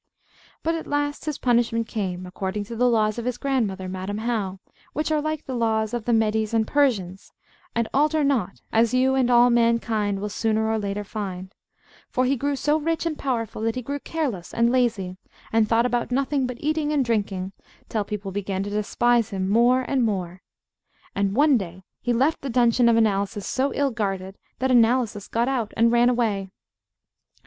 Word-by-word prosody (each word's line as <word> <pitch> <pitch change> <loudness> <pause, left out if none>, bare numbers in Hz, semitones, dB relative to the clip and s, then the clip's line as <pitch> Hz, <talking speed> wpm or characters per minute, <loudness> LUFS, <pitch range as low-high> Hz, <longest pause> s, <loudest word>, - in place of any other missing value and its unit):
But 330 - +1
at 325 -1 -4
last 290 0 -2
his 305 -3 -2
punishment 235 -2 +1
came, 185 -4 -3
according 190 +3 -4
to 230 +3 -8
the 245 +2 +3
laws 215 -1 +1
of 235 - -5
his 250 -1 -2
grandmother, 215 -9 -1
Madam 190 +2 -4
How, 215 -4 -2 0.3
which 305 +1 -1
are 305 -1 +2
like 310 0 -3
the 265 - -5
laws 220 -2 0
of 235 -3 -3
the 240 - +1
Medes 220 0 +1
and 220 -1 +3
Persians, 210 -10 0 0.4
and 230 -1 +1
alter 300 +2 +2
not, 245 -10 0
as 230 +2 +3
you 260 +1 +3
and 260 -2 +2
all 240 0 +6
mankind 230 -4 +1
will 205 - -3
sooner 220 +1 0
or 220 - 0
later 205 0 -3
find; 195 -2 -6 0.6
for 255 -1 +1
he 270 +2 +2
grew 285 +3 -1
so 295 +3 +1
rich 330 +2 -1
and 325 -2 -1
powerful 230 -5 -2
that 225 0 0
he 255 - -4
grew 285 +4 -4
careless 270 - -4
and 235 +1 +3
lazy, 220 -8 0 0.4
and 225 -1 +3
thought 230 +1 +3
about 245 -1 0
nothing 270 +1 0
but 250 -1 -6
eating 305 0 0
and 285 -4 +1
drinking, 200 -5 -1 0.4
till 215 -2 -1
people 205 -1 -5
began 195 -1 -2
to 205 - -5
despise 230 +2 +1
him 190 -1 -2
more 240 +5 +4
and 260 0 0
more. 185 -4 -2 0.7
And 200 0 0
one 285 -2 +5
day 185 -1 -8 0.2
he 245 - -1
left 270 +7 +1
the 275 - -4
dungeon 240 0 +4
of 230 - +4
Analysis 205 -1 +1
so 270 +2 0
ill 280 -1 +1
guarded, 195 -4 -3 0.2
that 260 0 0
Analysis 230 -3 +3
got 235 +2 0
out 245 -5 -1
and 230 +1 +4
ran 240 +1 +4
away. 215 -6 0
230 Hz, 190 wpm, -24 LUFS, 205-255 Hz, 0.7 s, all